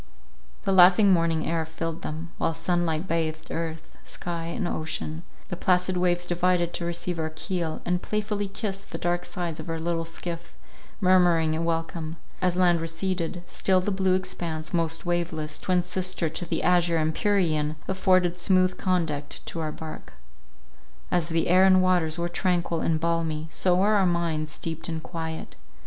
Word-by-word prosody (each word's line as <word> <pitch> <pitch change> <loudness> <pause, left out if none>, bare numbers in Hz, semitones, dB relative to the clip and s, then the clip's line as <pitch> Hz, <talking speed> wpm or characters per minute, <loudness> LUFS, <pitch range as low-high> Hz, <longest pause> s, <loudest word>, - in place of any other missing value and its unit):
The - - 0
laughing 190 +2 +7
morning 165 -2 +1
air 165 0 0
filled 165 +1 -5
them, 160 +2 -5
while 165 - 0
sun 175 +1 0
light 160 +3 -1
bathed 160 -1 -2
earth, 165 -1 -5
sky 170 -1 -5
and 175 +3 -2
ocean—the 160 +2 -5
placid 180 +1 +2
waves 175 -1 +1
divided 175 0 +1
to 170 - -3
receive 170 0 -3
our 160 0 -1
keel, 160 0 -3
and 180 0 0
playfully 210 -1 -2
kissed 195 -1 -5
the - - -3
dark 175 0 0
sides 170 -4 -4
of - - -7
our 165 - -2
little 165 0 -1
skiff, 170 +1 -7 0.5
murmuring 175 -4 +4
a 160 - -1
welcome; 165 -1 -2 0.3
as 180 -1 +2
land 175 -2 +3
receded, 175 +1 -2
still 185 +1 +1
the 185 +3 -1
blue 190 -1 +2
expanse, 165 -4 -4
most 165 -1 +1
waveless, 165 -3 -1
twin 180 -1 +1
sister 180 -1 +1
to 165 +3 -3
the - - -1
azure 175 -1 +3
empyrean, 155 -2 +1
afforded 185 -2 +2
smooth 185 0 +3
conduct 160 -6 -1
to 165 - -5
our 155 -1 -2
bark. 155 - -9 1.0
As 175 -2 +1
the 165 0 +1
air 185 +2 +6
and 190 -1 +6
waters 175 -4 +2
were 170 0 -1
tranquil 175 -1 0
and 160 -1 +1
balmy, 165 -2 -1
so 180 -1 +2
were 200 +4 +3
our 195 -3 +4
minds 165 -3 0
steeped 165 +1 -5
in 160 -1 -2
quiet. 160 - -6
170 Hz, 165 wpm, -26 LUFS, 160-180 Hz, 1.0 s, laughing